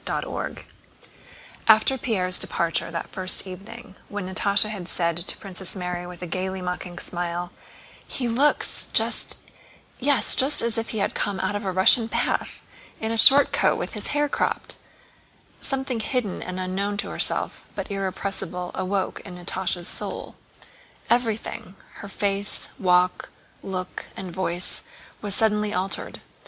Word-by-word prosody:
CHAPTER - - -3
XX - - -6 1.0
After 220 +4 +5
Pierre's 185 -7 +3
departure 165 -1 -1
that 170 -1 -6
first 185 0 +4
evening, 195 +3 -11 0.2
when 205 -3 -5
Natásha 200 +2 +3
had 195 -5 -7
said 170 -2 -1
to 175 - -1
Princess 190 -1 -6
Mary 180 -1 -5
with 180 0 -10
a - - -3
gaily 190 +2 -4
mocking 180 -1 -6
smile: 175 0 -4 0.6
"He 250 - -3
looks 270 +6 0
just, - - -1 0.6
yes, 265 -4 +2
just 270 0 +3
as 230 -1 0
if 225 - -5
he 220 - -5
had 200 - -1
come 200 -2 -3
out 190 +2 -2
of 205 - -4
a 190 - -2
Russian 190 +5 +5
bath—in 225 0 -4
a - - -1
short 275 +5 +12
coat - - +3
and - - -4
with - - -4
his - - -5
hair 295 0 0
cropped," - - -3 0.9
something 265 -3 -3
hidden 220 -3 -3
and 185 0 -6
unknown 195 +2 -3
to - - -4
herself, - - -2
but - - -6
irrepressible, 190 -2 -4
awoke 190 0 -3
in 185 -3 -11
Natásha's 175 0 -3
soul. - - -6 0.8
Everything: 225 -5 -2 0.2
her - - -9
face, 200 0 -1
walk, 180 -1 +1 0.3
look, 185 -1 -6
and 185 -2 -7
voice, 180 -1 -3 0.4
was 205 -2 -3
suddenly 210 -1 +1
altered. 190 +2 -3
195 Hz, 145 wpm, -23 LUFS, 180-220 Hz, 1.0 s, short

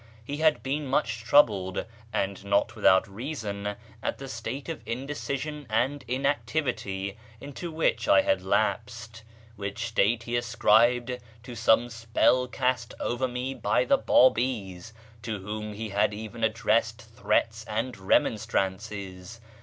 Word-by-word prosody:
He 145 +3 -4
had 155 -7 +3
been 140 +2 -2
much 115 -4 0
troubled 100 -8 +3 0.3
(and 100 -2 -2
not 100 +3 +1
without 95 -3 +4
reason) 105 -3 -4 0.3
at - - -2
the 135 - -8
state 130 +2 -5
of 165 -2 -5
indecision 140 +3 -4
and 125 +5 0
inactivity 120 -7 -1 0.2
into 145 +7 -7
which 160 - 0
I 300 -1 +6
had 290 0 +1
lapsed, 110 0 -1 0.4
which 100 +3 -4
state 115 +1 +2
he 120 +1 -3
ascribed 120 +1 +3 0.2
to 125 0 -8
some 110 +1 +3
spell 115 +2 +2
cast 125 -1 -1
over 125 +2 -1
me 125 +2 -3
by 125 - +1
the - - +4
Babis, 110 -5 +2 0.3
to 110 -1 -3
whom 105 +2 -5
he 110 +1 -5
had 105 +1 +1
even 110 +2 -7
addressed 110 0 +1
threats 110 +2 +1
and 115 +4 -2
remonstrances. 95 0 -1
115 Hz, 130 wpm, -27 LUFS, 105-130 Hz, 0.4 s, I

